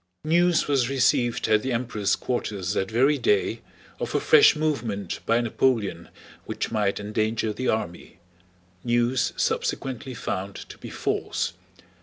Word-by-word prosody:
News 175 +1 +3
was 135 -4 +2
received 125 -2 +2
at 110 -1 +3
the 130 - -3
Emperor's 115 -4 0
quarters 100 -7 -3
that 95 -2 -1
very 135 +6 +3
day 420 0 +1 0.4
of - - -3
a - - +4
fresh 445 - +6
movement 120 - -2
by 115 +1 +3
Napoleon 110 -7 0 0.4
which - - -4
might 105 -3 0
endanger 110 +1 -1
the 130 +4 -3
army—news 90 +5 -3
subsequently 130 0 -2
found 100 -2 -4
to - - -10
be - - -8
false. - - -2
115 Hz, 130 wpm, -25 LUFS, 100-130 Hz, 0.4 s, fresh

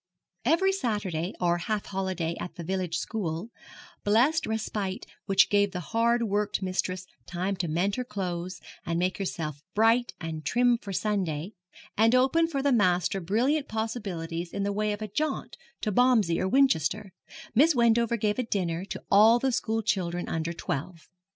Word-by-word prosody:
Every 335 +8 +3
Saturday 205 - -2
or 175 -1 +2
half 210 +3 -2
holiday 185 -4 -2
at 180 - -6
the 170 - -7
village 180 -1 -2
school 190 0 -3 0.5
blessed 250 +10 +3
respite 210 -3 -3 0.2
which 195 - +5
gave 205 -1 +3
the 180 - -3
hard 235 +1 +3
worked 205 -2 -1
mistress 185 0 -2 0.2
time 185 +3 -2
to 180 -1 -1
mend 180 +7 0
her 250 - -1
clothes, 185 -5 -4 0.2
and 165 0 -2
make 180 +2 0
herself 155 -6 -4
bright 225 +3 +3
and 160 -2 -5
trim 240 - +3
for 200 - -7
Sunday, 185 -4 -1 0.4
and 225 +3 +4
opened 300 +6 +3
for 275 -4 -2
the 285 - +3
master 185 -3 +2
brilliant 255 - +1
possibilities 185 -7 -4
in 200 - -2
the 200 0 -1
way 210 +1 0
of 205 +1 -4
a - - -3
jaunt 285 +8 -2 0.3
to 215 - -1
Bomsey 220 -7 +3
or 185 - +1
Winchester 200 - +2 0.4
Miss 300 +6 +5
Wendover 235 -1 +3
gave 210 +1 0
a - - +1
dinner 185 -5 -2
to - - -7
all 220 +4 +7
the 265 +2 0
school 225 -1 -1
children 175 -4 -1
under 165 +1 -2
twelve. 165 +1 -5
200 Hz, 165 wpm, -27 LUFS, 175-230 Hz, 0.5 s, all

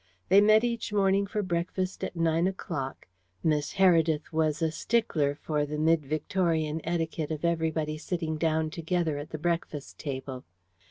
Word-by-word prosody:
They 195 +1 +7
met 215 +2 +6
each 235 -2 -2
morning 200 -1 +2
for 210 +1 -2
breakfast 185 +1 -2
at - - -3
nine 165 +1 +2
o'clock 165 -8 -4 0.4
Miss 150 -2 +1
Heredith 165 -5 +3
was 155 -1 +1
a 160 - +2
stickler 160 -8 0
for 150 0 -1
the 150 +1 -3
mid 160 0 +3
Victorian 160 0 0
etiquette 165 -2 -2
of 155 +1 -3
everybody 160 -2 0
sitting 160 -2 -3
down 160 -1 +1
together 165 -2 -1
at 145 +2 -7
the 155 - -5
breakfast 165 -3 -3
table. 130 -3 -5
160 Hz, 155 wpm, -28 LUFS, 155-180 Hz, 0.4 s, They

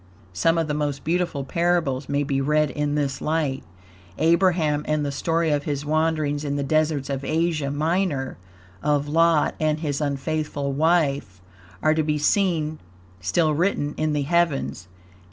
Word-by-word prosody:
Some 165 - +2
of 165 -1 0
the 150 - -1
most 145 -2 -2
beautiful 170 -4 -1
parables 150 -3 0
may 145 0 +1
be 135 -1 -1
read 150 +1 +2
in 150 +1 -1
this 140 -2 -1
light. 150 -4 -1 0.5
Abraham, 165 -3 +2
and 155 -1 0
the 140 - -2
story 165 +3 0
of 145 -1 0
his 145 -1 -2
wanderings 155 -1 0
in 145 -1 -2
the 140 - -1
deserts 155 -1 +1
of 135 -1 -3
Asia 160 -2 0
Minor; 150 - -1 0.4
of 145 -1 +1
Lot 165 0 +3
and 155 0 +1
his 145 -2 -2
unfaithful 145 0 -2
wife, 140 - +1 0.4
are 155 - +4
to 160 - +1
be 150 -1 0
seen 155 -1 +1 0.4
still 155 - +1
written 150 -3 0
in 155 -1 0
the 145 -1 0
heavens. 150 - 0
150 Hz, 155 wpm, -24 LUFS, 140-160 Hz, 0.5 s, are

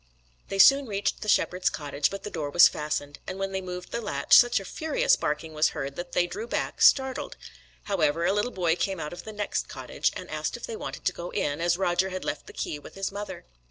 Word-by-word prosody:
They 195 - -3
soon 275 +7 +7
reached 200 -1 -2
the 215 - -3
shepherd's 185 -2 +2
cottage, 145 -1 -1
but 195 - -7
the 210 - -6
door 150 -4 -3
was 175 +4 +8
fastened; 145 -1 -4
and 185 - -4
when 195 0 -2
they 190 0 -2
moved 180 -1 -7
the 235 - -2
latch, 140 -10 +3
such 240 -3 +6
a 195 - -9
furious - - +1
barking 160 - -3
was 155 +1 +3
heard 135 0 -4
that 175 +2 -7
they 175 - +3
drew 430 - -6
back, - - -3
startled. 265 -1 +3 0.5
However, 170 -4 +1
a 195 - +3
little 210 +4 0
boy 175 -7 +1
came 190 0 -2
out 150 0 -5
of 175 - -9
the 220 - -6
next 210 -1 -2
cottage, - - -2
and - - -7
asked - - -3
if - - -7
they 465 - -6
wanted 440 - -7
to - - +2
go 175 +1 -6
in, 145 +2 -2
as 175 0 +2
Roger 185 0 +1
had 185 0 -5
left 145 - -4
the - - -9
key 150 - -4
with 145 - -13
his 195 0 -3
mother. 205 +1 -7
185 Hz, 240 wpm, -27 LUFS, 160-205 Hz, 0.5 s, was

